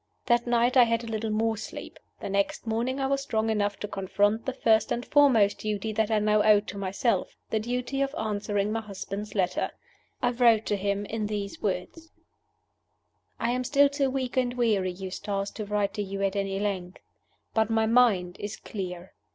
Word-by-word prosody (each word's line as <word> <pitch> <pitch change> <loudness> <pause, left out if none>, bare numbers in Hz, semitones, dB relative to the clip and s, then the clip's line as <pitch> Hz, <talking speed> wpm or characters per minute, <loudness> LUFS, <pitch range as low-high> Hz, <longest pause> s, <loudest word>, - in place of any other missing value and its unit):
That 240 0 +2
night 240 +1 +2
I 245 - +8
had 230 0 0
a - - -7
little 220 0 -2
more 220 +1 +1
sleep. 215 - -8 0.2
The - - -4
next 200 +3 -1
morning 235 +4 -1
I 270 - 0
was 275 0 0
strong 220 -4 0
enough 205 -2 0
to 210 - -3
confront 205 +3 0
the - - +1
first 220 -3 +2
and 240 - -1
foremost 245 -9 +4
duty 215 0 -2
that 220 0 +1
I 220 - +2
now 210 0 +3
owed 210 -1 +5
to 200 - -6
myself 200 +5 -1 0.2
the 220 - +1
duty 250 +4 -2
of 275 0 -1
answering 205 -1 -1
my 225 +1 -1
husband's 205 0 -6
letter. 180 -3 0 0.5
I 245 -2 +1
wrote 235 -3 +4
to 205 - 0
him 200 +1 -1
in 215 0 -3
these 205 -1 -4
words: 210 - -3 1.3
"I 235 - 0
am 250 +1 -1
still 280 +2 +4
too 280 -1 0
weak 260 -1 -3
and 250 -1 +1
weary, 215 -6 +2
Eustace, 195 +2 -4
to 215 - -6
write 205 -1 0
to 210 - -3
you 195 0 -3
at 195 0 0
any 195 -1 -1
length. 190 -3 -3 0.6
But 220 0 +2
my 225 0 +2
mind 220 -7 +3
is 205 +1 -5
clear. 180 -3 -7
215 Hz, 190 wpm, -27 LUFS, 200-235 Hz, 1.3 s, I